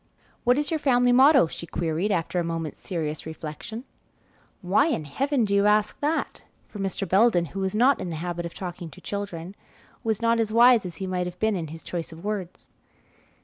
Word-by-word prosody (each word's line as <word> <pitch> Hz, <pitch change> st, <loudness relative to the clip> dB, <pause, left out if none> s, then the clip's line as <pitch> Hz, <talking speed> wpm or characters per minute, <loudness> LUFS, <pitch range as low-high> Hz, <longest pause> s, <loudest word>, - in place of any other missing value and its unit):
"What 245 Hz, +2 st, +4 dB
is 295 Hz, +3 st, -1 dB
your 320 Hz, -, 0 dB
family 245 Hz, -3 st, +3 dB
motto?" 270 Hz, -, +6 dB
she 170 Hz, +1 st, -8 dB
queried, 165 Hz, +5 st, -1 dB
after 175 Hz, -1 st, 0 dB
a -, -, 0 dB
moment's 165 Hz, -2 st, -4 dB
serious 155 Hz, -4 st, -4 dB
reflection. 160 Hz, +9 st, -7 dB, 0.8 s
"Why 190 Hz, -, +3 dB
in 165 Hz, -, -1 dB
Heaven 265 Hz, -, 0 dB
do 200 Hz, -, -1 dB
you 200 Hz, +1 st, +4 dB
ask 210 Hz, 0 st, +2 dB
that?" 305 Hz, +3 st, -2 dB, 0.2 s
for 210 Hz, -, -10 dB
Mr. 195 Hz, 0 st, -2 dB
Belden, 190 Hz, -3 st, +4 dB
who 195 Hz, -, -4 dB
was 190 Hz, +1 st, -1 dB
not 255 Hz, +5 st, +4 dB
in 180 Hz, -, -4 dB
the 165 Hz, -, -4 dB
habit 175 Hz, +1 st, -4 dB
of 170 Hz, -, -13 dB
talking 175 Hz, -2 st, -6 dB
to 145 Hz, -, -14 dB
children, 195 Hz, -3 st, -5 dB, 0.5 s
was 220 Hz, -2 st, 0 dB
not 230 Hz, 0 st, +2 dB
as 220 Hz, -1 st, 0 dB
wise 235 Hz, -3 st, +6 dB
as 170 Hz, -, -9 dB
he 190 Hz, -, -5 dB
might 180 Hz, -1 st, -2 dB
have 180 Hz, 0 st, -8 dB
been 220 Hz, +1 st, +1 dB
in 165 Hz, -3 st, -3 dB
his 160 Hz, +2 st, -10 dB
choice 170 Hz, -2 st, -5 dB
of 165 Hz, +2 st, -11 dB
words. 200 Hz, -4 st, -5 dB
195 Hz, 205 wpm, -25 LUFS, 170-230 Hz, 0.8 s, motto